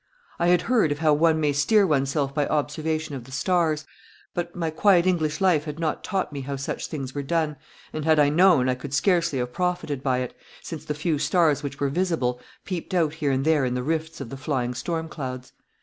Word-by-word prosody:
I 170 - +2
had 175 0 +4
heard 230 -11 +2
of 145 - -1
how 155 -1 +3
one 160 +1 +3
may 150 -2 +1
steer 200 +9 +4
oneself 140 -3 0
by 145 0 0
observation 155 +1 -1
of 130 -4 -6
the 130 - -14
stars, 155 +1 +1 0.5
but 175 0 -4
my 165 -3 -2
quiet 180 +1 +4
English 155 -5 +1
life 175 -6 +3
had 150 -1 -5
not 160 -2 -2
taught 190 -6 -2
me 140 - -4
how 140 +1 -4
such 135 0 -4
things 135 -4 -5
were 145 - -2
done, 155 +1 0 0.4
and 155 - -3
had 160 0 +4
I 145 -1 +5
known 165 -4 +5
I 130 - +2
could 135 +2 -5
scarcely 170 -2 +2
have 125 -1 -3
profited 175 -6 -1
by 130 -2 +1
it, 125 - -4 0.3
since 165 -3 -8
the 150 - -3
few 155 0 -1
stars 155 0 +2
which 140 0 -6
were 140 - +1
visible 140 -7 0 0.2
peeped 185 0 -4
out 160 -4 +2
here 155 -3 -1
and 135 +1 0
there 155 -3 +3
in 125 -1 0
the 125 - -2
rifts 160 +2 -2
of 135 -5 -6
the 135 - -6
flying 130 -3 -2
storm 160 +5 -3
clouds. 130 -5 -6
150 Hz, 225 wpm, -25 LUFS, 140-165 Hz, 0.5 s, I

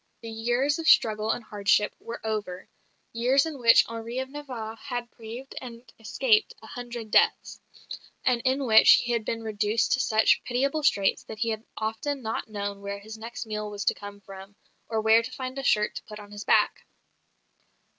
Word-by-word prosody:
The 225 - -6
years 240 +7 0
of 325 - -3
struggle 215 -1 +4
and 230 - -1
hardship 210 -1 +1
were 235 +1 -7
over 210 -4 -4 0.5
years 255 +5 +3
in 310 -4 -6
which 230 -1 +6
Henri 230 +1 -6
of 260 0 -3
Navarre 250 -7 -6
had 245 -2 -5
braved 235 +4 -9
and 235 -2 -9 0.2
escaped 435 - +1
a - - -15
hundred 240 -3 -7
deaths; - - +2 0.6
and 250 -2 +2
in 265 +1 +1
which 220 -2 +8
he 240 - +2
had 230 -2 0
been 230 0 -3
reduced 215 +1 0
to - - +3
such 220 -3 +3
pitiable 275 +5 0
straits 200 -9 +2
that 220 - -8
he 230 +1 -1
had 220 0 -3
often 245 +6 -3
not 220 0 -3
known 200 -1 -5
where 200 0 -5
his 215 +2 -10
next 230 +2 -7
meal 215 -1 -4
was 205 -1 -5
to - - +3
come 205 0 -10
from 195 +1 -12 0.3
or 220 -1 0
where 220 +1 +5
to 230 +2 -7
find 260 +1 -5
a - - -5
shirt 210 -4 +2
to - - -7
put 210 - -10
on 205 0 -12
his 205 0 -8
back. - - +2
225 Hz, 190 wpm, -26 LUFS, 215-255 Hz, 0.6 s, which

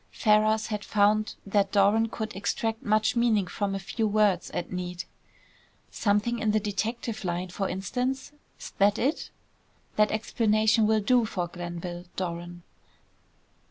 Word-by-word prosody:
Ferrars 215 0 +3
had 210 -1 -4
found 210 +1 +2
that 200 0 +1
Doran 205 +3 +4
could 220 0 -5
extract 225 +3 -2
much 215 +2 +2
meaning 230 -4 +3
from 195 +2 -2
a - - -2
few 220 +3 -2
words, 205 -4 +2
at 175 - -4
need. 180 -1 -4 0.9
"Something 210 +3 +1
in 220 - 0
the 215 +1 +3
detective 220 +2 -3
line, 180 0 -2
for 195 +2 -2
instance? 250 +9 -2 0.3
'S - - -8
that 205 +2 +4
it?" 275 +6 -1 0.7
"That 210 0 +4
explanation 220 0 +2
will 220 0 +3
do 240 +2 +3
for 180 -5 -3
Glenville, 175 0 -6
Doran." 175 -1 -5
210 Hz, 140 wpm, -27 LUFS, 190-220 Hz, 0.9 s, Doran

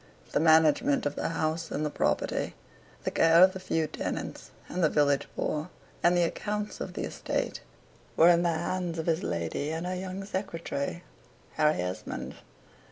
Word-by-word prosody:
The - - +2
management 160 -3 +4
of 145 - 0
the - - -1
house, 165 0 -1
and 155 - -2
the 150 - -2
property, - - 0 0.5
the - - -1
care 165 +2 +6
of 185 0 +6
the 190 - -6
few 165 -3 0
tenants - - -5 0.2
and 180 - -2
the 155 - +5
village 145 -2 +2
poor, 155 +3 -2 0.3
and 175 +1 +4
the 175 - +4
accounts 210 +4 -3
of - - -4
the - - -4
estate, - - -3 0.6
were 165 - +8
in 170 -1 +5
the 175 - +2
hands 170 +1 -2
of 160 - -3
his 165 +1 +1
lady 85 - -2
and 160 +2 -3
her 180 - -2
young 185 +1 -5
secretary, 170 -5 -4 0.5
Harry 155 0 +2
Esmond. 90 +1 -5
165 Hz, 170 wpm, -29 LUFS, 155-180 Hz, 0.6 s, were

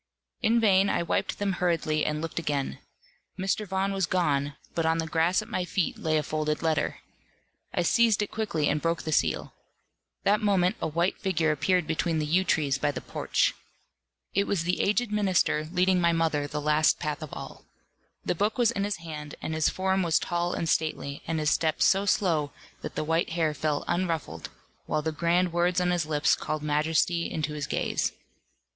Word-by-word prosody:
In 230 +2 +3
vain 195 -3 +4
I - - +1
wiped - - -1
them 205 -1 0
hurriedly 165 -4 0
and 150 +1 -2
looked 165 +1 -3
again. 145 -4 -2 0.6
Mr. 195 +2 -1
Vaughan 190 +1 -1
was 190 -3 0
gone; 145 -6 0 0.2
but 165 - 0
on 160 0 +2
the 165 - -1
grass 165 +5 +1
at - - -14
my 185 - -2
feet 180 0 -1
lay 155 -1 +1
a 150 - 0
folded 155 +1 -2
letter. 155 -2 0 0.7
I 175 - 0
seized 225 +2 +3
it 205 - -6
quickly, 195 -9 -1
and 150 +1 +1
broke 165 0 -1
the 155 - -3
seal. - - 0 0.7
That 210 +2 +3
moment 200 0 +2
a - - 0
white 170 +4 0
figure 165 -5 +1
appeared 175 +4 +1
between 160 +1 0
the 155 - 0
yew 175 +5 +2
trees 145 -7 +1
by 145 - +1
the 145 - -3
porch. - - 0 0.8
It 200 +1 +1
was 185 -5 0
the 180 +2 0
aged 210 +2 +1
minister 185 -7 +1
leading 185 0 +2
my 170 -1 +3
mother 160 -3 0
the 150 +1 -4
last 150 +1 +3
path 150 0 -3
of 155 - -7
all. - - -8 0.6
The - - +1
book 205 +8 0
was 235 -2 +3
in 200 -4 -1
his 205 -1 -1
hand, 150 -3 -8
and 160 - -4
his 155 0 +2
form 190 0 0
was 170 -2 +2
tall 175 0 -1
and 165 - -2
stately, 155 -3 -1
and 165 0 -1
his 150 0 +1
step 160 -1 +1
so 195 +1 +3
slow, 160 -8 +1 0.3
that - - -6
the - - -1
white 165 +2 0
hair 160 -2 +1
fell 150 0 -1
unruffled, 165 - -2 0.4
while 150 - 0
the 160 - -1
grand 170 +3 +1
words 175 +1 +2
on 180 0 +1
his 175 -3 0
lips 150 -1 +2
called 155 -1 -4
majesty 160 +3 +1
into 155 -1 -3
his 150 -2 -4
gaze. - - -1
165 Hz, 195 wpm, -27 LUFS, 155-185 Hz, 0.8 s, vain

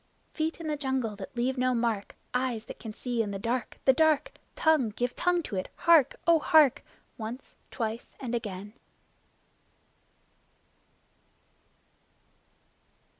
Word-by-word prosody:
Feet 320 +1 -2
in 330 - -7
the 305 - 0
jungle 265 -6 -1
that 200 +4 -9
leave 255 +2 0
no 255 0 +2
mark! 230 -4 -1 0.2
Eyes 250 -3 -1
that - - -9
can 225 - -7
see 240 +1 -2
in 210 - -2
the 200 - -3
dark 230 +3 -2
the 265 - +7
dark! 310 0 +3 0.2
Tongue 315 -8 +3
give 245 +4 -2
tongue 355 -1 +1
to 225 - -5
it! 185 - -3
Hark! 330 -6 +5
O 335 -1 +5
hark! 305 -5 +5 0.4
Once, 230 +4 -7
twice 225 -1 -4
and 245 -3 -4
again! 205 -3 -4
250 Hz, 130 wpm, -29 LUFS, 225-295 Hz, 0.4 s, the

